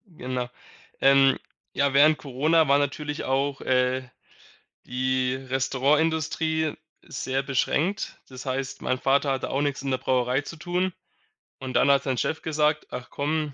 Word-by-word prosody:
Genau. 125 -7 -4 0.5
Ähm, 135 -1 +5 0.4
ja, 140 -1 +1
während 150 +3 +6
Corona 155 +4 +2
war 140 +1 +5
natürlich 145 +1 -2
auch, 135 +1 -1
äh, 130 0 +1 0.8
die 130 0 0
Restaurantindustrie 150 +4 0 0.3
sehr 135 +1 -3
beschränkt. 145 +8 -1
Das 130 0 -10
heißt, 130 0 -3
mein 130 - 0
Vater 140 +2 +2
hatte 130 - -3
auch 135 - 0
nix 145 -2 -1
in 135 - -2
der 130 - +1
Brauerei 125 0 +1
zu 165 - -9
tun 180 +3 -1 0.7
und 130 -1 -6
dann 140 - +5
hat 140 -1 +3
sein 130 -2 -1
Chef 160 - -1
gesagt: 150 -1 0
„Ach 125 - -6
komm, 150 0 -2
140 Hz, 145 wpm, -25 LUFS, 130-150 Hz, 0.8 s, während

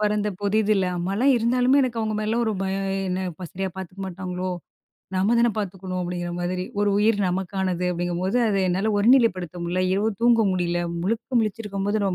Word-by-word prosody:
பொறந்த 210 0 +1
புதிதில. 215 +1 +2
இல்ல, 190 - +1
அம்மாலாம் 200 +10 +2
இருந்தாலுமே 250 +4 +3
எனக்கு 240 -3 -1
அவங்க 215 -1 -1
மேலலாம் 225 +3 0
ஒரு 220 - +1
பயம். 195 0 -1 0.2
என்ன 185 -1 -3
"சரியா 190 +1 -2
பாத்துக்க 190 +1 -8
மாட்டாங்களோ? 185 0 -4 0.7
நம்ம 200 +5 +2
தான 240 - +4
பாத்துக்கணும்." 185 -2 -4
அப்படிங்கிற 175 0 -3
மாரி. 180 +1 -2
ஒரு 205 0 +3
உயிர் 210 0 +3
நமக்கானது. 185 -1 -1
அப்படிங்கும்போது, 175 +4 -1
அதை 195 -2 +1
என்னால 195 +4 +1
ஒருநிலைப்படுத்த 205 - +3
முடியல, 180 +2 0
இரவு 210 +3 +1
தூங்க 235 -1 +5
முடியல. 175 -1 0 0.2
முழுக்க 230 +5 0
முழிச்சிருக்கும்போது 210 -1 -2
நம்ம 190 - 0
195 Hz, 165 wpm, -24 LUFS, 185-220 Hz, 0.7 s, தூங்க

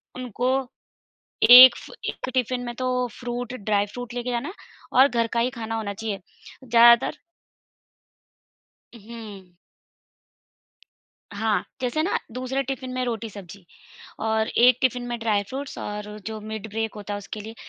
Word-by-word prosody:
उनको 250 0 -2 1.0
1 250 0 +11
फ - - -11 0.2
1 - - -7
टिफिन 255 0 0
में 240 0 -5
तो 255 - -3 0.3
फ़्रूट, 245 -1 -4
ड्राई 205 -3 0
फ़्रूट 245 +3 -8
लेके 245 0 -3
जाना 240 +4 -2
है 370 - -8 0.5
और 270 - +7
घर 235 -3 0
का 235 - +2
ही 245 +2 +1
खाना 225 -2 -6
होना 205 -2 -4
चाहिए। 210 -1 -4 0.4
ज़्यादातर 235 +3 +5 1.8
उहुँ। 210 -5 -11 1.8
हाँ, 210 +1 0 0.2
जैसे 255 +5 0
ना 370 - 0
दूसरे 255 +2 -2
टिफिन 260 -1 -5
में 255 0 -2
रोटी-सब्जी 205 -5 -7 0.6
और 220 0 +1
1 250 +1 +4
टिफिन 250 -1 +1
में 240 0 -3
ड्राई 215 -3 +1
फ्रूट्स 275 +3 -6
और 210 0 -6
जो 220 -1 -5
मिड 220 0 -7
ब्रेक 225 +1 -3
होता 205 0 -6
है - - -3
उसके 205 +1 -8
लिए 220 +2 -9
230 Hz, 145 wpm, -24 LUFS, 210-250 Hz, 1.8 s, 1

